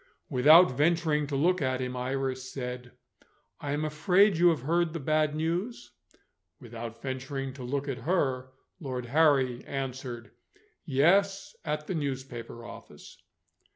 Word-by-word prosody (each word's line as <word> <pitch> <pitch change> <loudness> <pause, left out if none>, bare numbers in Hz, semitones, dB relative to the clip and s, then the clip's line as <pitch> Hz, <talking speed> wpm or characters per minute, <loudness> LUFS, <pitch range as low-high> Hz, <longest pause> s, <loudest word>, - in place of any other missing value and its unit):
Without 150 +4 +7
venturing 150 +1 +1
to 140 - -3
look 175 +6 +2
at 130 -1 0
him, 125 0 -3
Iris 130 0 -3
said: 125 -2 -6 0.7
"I 145 - -4
am 150 +1 -1
afraid 180 +6 +3
you 175 +2 +5
have 160 -6 0
heard 165 0 -1
bad 155 -1 +2
news?" 175 +9 -3 0.7
Without 115 -2 -8
venturing 135 0 -4
to 130 -1 -9
look 140 +3 -3
at 130 -3 -3
her, 130 -4 0 0.3
Lord 130 -6 -4
Harry 135 -3 +2
answered: 130 -3 -5 0.5
"Yes, 195 +7 +2
at 150 0 -3
the 185 - -3
newspaper 130 -6 -5
office." - - -12
140 Hz, 130 wpm, -28 LUFS, 130-160 Hz, 0.7 s, Without